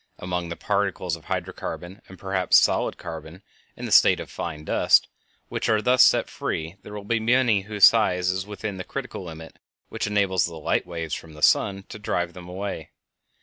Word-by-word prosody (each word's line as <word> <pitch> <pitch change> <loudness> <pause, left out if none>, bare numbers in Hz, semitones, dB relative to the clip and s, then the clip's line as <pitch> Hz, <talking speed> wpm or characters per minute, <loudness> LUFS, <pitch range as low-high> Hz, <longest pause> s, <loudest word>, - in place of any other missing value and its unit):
Among 90 -1 -3
the 85 - -4
particles 100 -4 -1
of 80 - -15
hydro - - -3
carbon, 90 +4 -7
and 95 - -12
perhaps 95 -1 +2
solid - - +2
carbon - - -9 0.3
in - - -6
the - - -5
state - - +6
of - - -8
fine 75 -1 -6
dust, - - +4 0.4
which - - -3
are 110 -1 +3
thus 125 +4 +3
set - - +5
free 80 +4 -4
there 105 - -10
will 105 - -6
be 115 +3 0
many 115 -2 +3
whose 105 0 +6
size 90 -5 +2
is 95 +1 -4
within 105 -1 -5
the 90 - -5
critical 125 -5 -6
limit 80 -2 -10 0.3
which - - -3
enables 100 -4 +1
the 85 - -9
light 80 +2 -1
waves 85 -3 -5
from 80 -1 -6
the 75 0 -10
sun 95 -1 +3
to 110 - -8
drive 90 -4 -2
them 90 0 -11
away. 95 -4 -5
95 Hz, 195 wpm, -24 LUFS, 85-105 Hz, 0.4 s, state